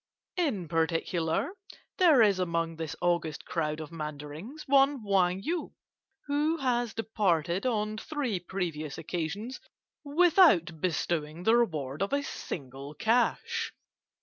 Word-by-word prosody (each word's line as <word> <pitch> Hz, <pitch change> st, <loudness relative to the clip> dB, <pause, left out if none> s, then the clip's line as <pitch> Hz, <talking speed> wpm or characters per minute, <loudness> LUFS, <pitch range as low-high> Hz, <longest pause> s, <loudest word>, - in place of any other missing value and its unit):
In 250 Hz, -, 0 dB
particular, 165 Hz, -, 0 dB, 0.5 s
there 315 Hz, -10 st, +7 dB
is 200 Hz, -3 st, +3 dB
among 165 Hz, -2 st, -1 dB
this 160 Hz, -1 st, -4 dB
august 170 Hz, -3 st, 0 dB
crowd 155 Hz, -2 st, -2 dB
of 155 Hz, 0 st, -7 dB
Mandarins 155 Hz, -, -7 dB
one 275 Hz, -2 st, +4 dB
Wang 190 Hz, -2 st, +2 dB
Yu, 335 Hz, +5 st, -2 dB, 0.5 s
who 295 Hz, +3 st, +1 dB
has 245 Hz, -5 st, 0 dB
departed 190 Hz, -4 st, 0 dB
on 215 Hz, -2 st, -1 dB
three 270 Hz, -, -2 dB
previous 170 Hz, -5 st, -4 dB
occasions 175 Hz, -, -4 dB, 0.4 s
without 295 Hz, -, +4 dB
bestowing 165 Hz, -2 st, -1 dB
the 225 Hz, +4 st, +5 dB
reward 155 Hz, -, 0 dB
of 200 Hz, +6 st, -1 dB
a 285 Hz, 0 st, +1 dB
single 140 Hz, -, -6 dB
cash. 250 Hz, -, +1 dB
185 Hz, 120 wpm, -29 LUFS, 160-255 Hz, 0.5 s, there